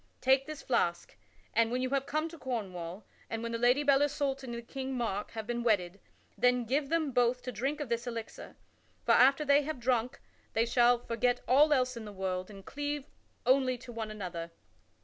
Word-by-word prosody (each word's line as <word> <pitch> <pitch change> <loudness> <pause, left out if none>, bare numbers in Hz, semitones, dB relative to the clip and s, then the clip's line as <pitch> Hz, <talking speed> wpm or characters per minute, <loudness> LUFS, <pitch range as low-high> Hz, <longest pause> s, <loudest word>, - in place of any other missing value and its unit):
Take 265 +1 +3
this 305 -2 -7
flask, 175 -9 0 0.4
and 230 0 +3
when 250 +1 0
you 255 - -2
have 275 0 0
come 310 +2 0
to 330 -1 -12
Cornwall, 190 -7 -5 0.2
and 225 0 -4
when 230 - -3
the 230 - -2
Lady 250 +4 +4
Belle 280 -1 +4
Isoult 285 -2 0
and 235 -2 -6
King 265 -1 -4
Mark 210 -4 -2
have 220 -1 -5
been 240 +1 -2
wedded, 200 -5 +1 0.4
then 250 -1 +2
give 275 +4 0
them 320 -3 +1
both 245 0 +2
to 250 - -4
drink 270 +7 -2
of 295 - -3
this 235 +1 -2
elixir; 230 -2 -7 0.5
for - - +3
after 275 +4 +5
they 285 0 +5
have 300 -2 -4
drunk 250 +1 0 0.3
they 225 +1 +2
shall 240 0 +4
forget 240 +1 0
all 290 +4 +5
else 255 -3 +2
in 230 -2 -7
the 210 - -7
world 185 -1 -3
and 195 -2 -12
cleave 290 0 -3 0.4
only 260 -1 +3
to 240 - -11
one 225 -2 -4
another. 180 -5 -5
245 Hz, 200 wpm, -31 LUFS, 225-275 Hz, 0.5 s, after